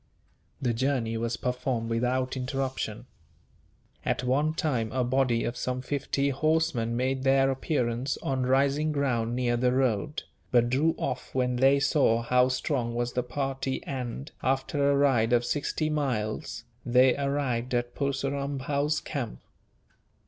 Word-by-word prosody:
The 125 -3 0
journey 120 -2 0
was 115 +1 -2
performed 125 -2 -2
without 125 +3 0
interruption. 130 -4 -3 1.0
At - - -1
one 145 +5 +1
time, 125 -10 -1
a 130 -1 0
body 125 -2 +1
of 120 - -2
some 125 +1 -3
fifty 140 0 -1
horsemen 140 -5 +1
made 130 +1 0
their 135 0 +4
appearance 130 -2 -1
on 130 -2 0
rising 140 +3 +2
ground 120 -5 0
near 120 -1 +1
the 125 +1 +2
road, 130 +2 0 0.3
but 120 -1 +3
drew 155 +5 +2
off 125 +1 -4
when 125 -1 +1
they 135 +2 +5
saw 135 -4 +3
how 125 +1 +4
strong 125 -2 -1
was 120 0 -1
the 125 - +1
party 135 +1 -3
and, 130 +1 -5
after 135 +2 +1
a 140 - +3
ride 125 -5 +3
of 120 0 +3
sixty 145 +4 -1
miles, 115 -7 -2 0.2
they 125 +1 +4
arrived 135 -3 -1
at 120 0 -1
Purseram 140 0 -2
Bhow's 145 +3 0
camp. - - -5
130 Hz, 140 wpm, -28 LUFS, 120-140 Hz, 1.0 s, they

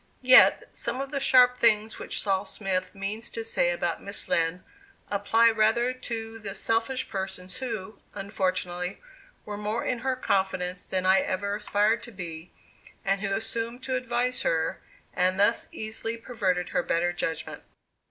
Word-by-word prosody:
Yet, 255 0 +7
some 255 - -2
of 275 0 -4
the 280 - -1
sharp 250 -2 +5
things 220 -1 +3
which - - -2
Sol. 195 -2 +1
Smith 190 -2 -3
means 205 +4 -3
to 230 - -4
say 225 -6 +2
about 175 -1 -1
Miss 200 +1 -2
Lind, 165 +2 +1 0.5
apply 225 +3 +4
rather 225 +3 +2
to 225 -3 -6
the 200 -2 -6
selfish 225 +5 0
persons 190 0 -5
who, 220 -6 -5 0.2
unfortunately, 185 -2 -2 0.5
were 210 -1 -5
more 210 +3 -2
in 250 - -1
her 260 +1 -1
confidence 190 -5 -1
than 185 -1 -1
I 190 +1 +6
ever 200 +2 -1
aspired 210 +2 +1
to 240 - -9
be, 170 -4 -7 0.5
and 195 0 +1
who 200 -2 -2
assumed 230 +3 -2
to 260 -1 -1
advise 250 0 0
her 160 0 0 0.3
and 185 +1 +1
thus 205 +3 +3
easily 225 +1 -4
perverted 190 -7 -1
her - - +1
better 175 +1 0
judgment. 165 -2 -4
205 Hz, 155 wpm, -27 LUFS, 185-230 Hz, 0.5 s, Yet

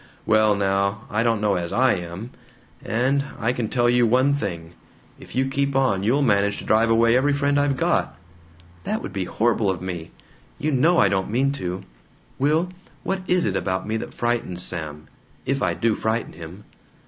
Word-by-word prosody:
"Well 110 -1 +4
now, 100 +1 0
I 110 - +1
don't 115 -2 +1
know 105 -1 +1
as 85 -1 -4
I 130 +1 +3
am! 90 +6 -6 0.5
And 130 +5 +1
I 115 +2 0
can 120 -4 -3
tell 120 -1 +2
you 120 0 +4
one 130 +5 +3
thing: 85 -11 -4 0.5
if - - -12
you 130 +1 +2
keep 140 +1 -1
on 130 -8 +2
you'll 125 +8 +2
manage 100 -4 +2
to - - -7
drive 110 +1 +3
away 115 +1 +4
every 140 +3 +3
friend 140 0 +1
I've 145 -2 +1
got." 75 - 0 0.7
"That - - -2
would - - -6
be 95 -2 -2
horrible 110 0 +1
of 95 - -1
me. 90 -3 -6 0.5
You 155 +1 -1
KNOW 160 +6 +3
I 100 - +5
don't 95 -1 -1
mean 130 +5 +1
to 95 -8 -4 0.6
Will, 155 +6 +2 0.3
what 190 0 -2
is 180 -1 +2
it 95 - -1
about 95 0 -2
me 110 - -1
that - - -6
frightens 120 -7 -1
Sam 75 -3 -5 0.4
if 135 0 -1
I 85 -3 +1
do 115 +3 +1
frighten 110 +2 -2
him." 85 +4 -10
115 Hz, 190 wpm, -23 LUFS, 95-135 Hz, 0.7 s, I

